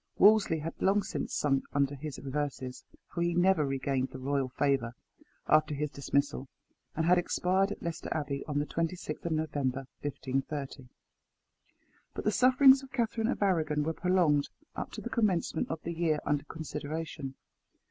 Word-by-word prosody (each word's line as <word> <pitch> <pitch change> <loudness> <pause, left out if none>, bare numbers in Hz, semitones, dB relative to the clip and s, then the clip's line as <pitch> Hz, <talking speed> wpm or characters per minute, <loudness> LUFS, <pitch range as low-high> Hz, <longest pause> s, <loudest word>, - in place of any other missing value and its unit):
Wolsey 205 -5 +6
had 160 +2 -4
long 200 +1 +3
since - - -4
sunk 135 -2 +1
under 140 0 +2
his 145 +1 -6
reverses 135 -2 -4 0.3
for 170 - -2
he 170 0 +1
never 175 -2 +4
regained 135 -1 -1
the - - -8
royal 135 0 -1
favour 135 -3 0 0.5
after 155 -1 +4
his 150 0 -2
dismissal 140 -1 -1 0.5
and 160 - 0
had 180 +1 +5
expired 190 +3 +1
at - - -6
Leicester 170 0 -4
Abbey, 140 -3 -2
on 145 -2 -2
the 145 - +1
26th 165 0 -3
November 145 -4 -1 0.2
1530. 135 -1 -4 1.3
But - - -4
the 215 - +2
sufferings 265 +3 +6
of 270 -1 -12
Catherine 230 -3 0
of 240 - 0
Arragon 155 -6 +2
were 160 +2 -1
prolonged 170 -5 +2 0.3
up - - -4
to - - -6
the - - -5
commencement 190 -8 +1
of 160 - -3
the 170 - -3
year 165 -2 +1
under 145 0 0
consideration. 155 -3 -5
155 Hz, 160 wpm, -30 LUFS, 140-180 Hz, 1.3 s, Wolsey